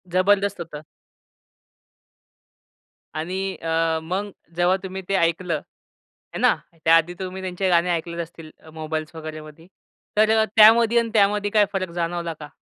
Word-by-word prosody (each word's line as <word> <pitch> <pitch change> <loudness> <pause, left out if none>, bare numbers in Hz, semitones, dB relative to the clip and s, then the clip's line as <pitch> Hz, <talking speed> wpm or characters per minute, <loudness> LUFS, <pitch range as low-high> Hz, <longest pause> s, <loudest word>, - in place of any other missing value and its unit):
जबरदस्त 200 0 +2
होतं. 155 -3 -8 2.4
आणि 180 +4 -3
अ, 165 0 0
मग 190 +5 -3 0.3
जेव्हा 175 +2 +3
तुम्ही 190 0 -6
ते 195 - +1
ऐकलं, 170 0 +1
आहे - - -13
ना. - - +5 0.3
त्याआधी 165 +2 +4
तुम्ही 190 0 -5
त्यांचे 185 0 -2
गाणे 175 0 +3
ऐकले 170 0 -3
असतील, 165 -1 -10 0.2
मोबाइल्स 155 +1 -5
वगैरेमध्ये, 155 +1 -9 0.5
तर 220 +1 +4
त्यामध्ये 230 +2 +7
आणि 230 -1 -1
त्यामध्ये 205 0 +2
काय 210 -2 +4
फरक 185 -3 -2
जाणवला 170 -1 -3
का? 150 -1 -9
175 Hz, 130 wpm, -23 LUFS, 165-195 Hz, 2.4 s, त्यामध्ये